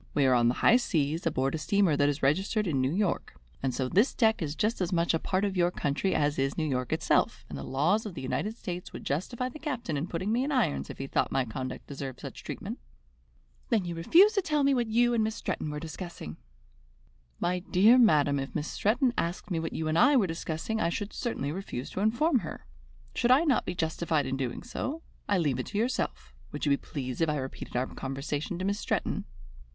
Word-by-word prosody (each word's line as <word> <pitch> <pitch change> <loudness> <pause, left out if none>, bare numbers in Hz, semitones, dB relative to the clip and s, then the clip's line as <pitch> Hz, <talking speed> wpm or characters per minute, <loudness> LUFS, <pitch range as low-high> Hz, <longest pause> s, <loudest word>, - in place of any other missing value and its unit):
We 145 - +4
are 130 - +5
on 120 -1 +4
the 120 - +2
high 240 - +8
seas, 160 - 0
aboard 135 -3 0
a 160 - -2
steamer 195 0 +2
that 145 0 +3
is 145 0 -3
registered 195 +9 +2
in 145 -7 +1
New 130 +1 +1
York, 195 +1 -1 0.3
and 135 - 0
so 125 +1 -1
this 205 - +3
deck 220 -4 +3
is 150 -2 -2
just 215 +3 0
as 180 0 0
much 170 -1 +2
a 165 - +1
part 190 +4 0
of 195 -1 -2
your 175 -1 +3
country 155 +3 -1
as 145 -1 +1
is 135 0 0
New 155 - 0
York 125 -3 -2
itself, - - +1
and 75 - -7
the 70 - -5
laws 170 - +1
of 190 - -8
the 135 - -5
United 210 - -2
States 180 -4 -6
would - - -8
justify 235 - -2
the 255 +5 -9
captain 250 - -3
in 150 +5 -2
putting 185 +5 -2
me 240 +3 +2
in 290 - -2
irons 240 - +1
if - - -7
he 135 - -4
thought - - 0
my 135 -1 +1
conduct 130 +3 -5
deserved 135 -2 -6
such - - -8
treatment." - - -6 0.9
"Then 215 -5 +2
you 175 - -3
refuse 345 - +5
to 400 - +2
tell 300 -4 +1
me 275 0 +4
what 240 -3 +1
you 240 +2 +3
and 225 -2 +2
Miss 220 0 -1
Stretton 155 - -3
were 150 0 -4
discussing!" 165 - -7 1.0
"My 180 +1 0
dear 205 +7 +5
madam, 145 - +4
if 135 0 -5
Miss 150 - -2
Stretton 240 +4 +1
asked 170 +3 -3
me 165 - +1
what 160 - -4
you 160 - -2
and 155 +1 +2
I 280 +7 +6
were 220 - +4
discussing, 165 +5 -3
I - - +2
should 205 +4 -4
certainly 185 - -2
refuse 160 -8 -5
to - - -4
inform 240 +8 +3
her. - - -8 0.5
Should 240 - +1
I 260 +5 +6
not 290 -6 +2
be 180 - -2
justified 160 -2 0
in 130 +1 -2
doing 130 -3 -3
so? 285 +6 -4 0.3
I 200 - +3
leave 145 -7 +1
it - - -3
to 205 - -4
yourself. 225 - -2 0.2
Would - - -3
you 145 - +2
be 140 - +4
pleased 130 -3 -5
if 165 - +3
I 150 - 0
repeated 135 -2 -6
our 125 - +1
conversation 140 +6 -4
to 185 - -3
Miss 200 +1 0
Stretton?" - - -1
170 Hz, 235 wpm, -29 LUFS, 140-220 Hz, 1.0 s, high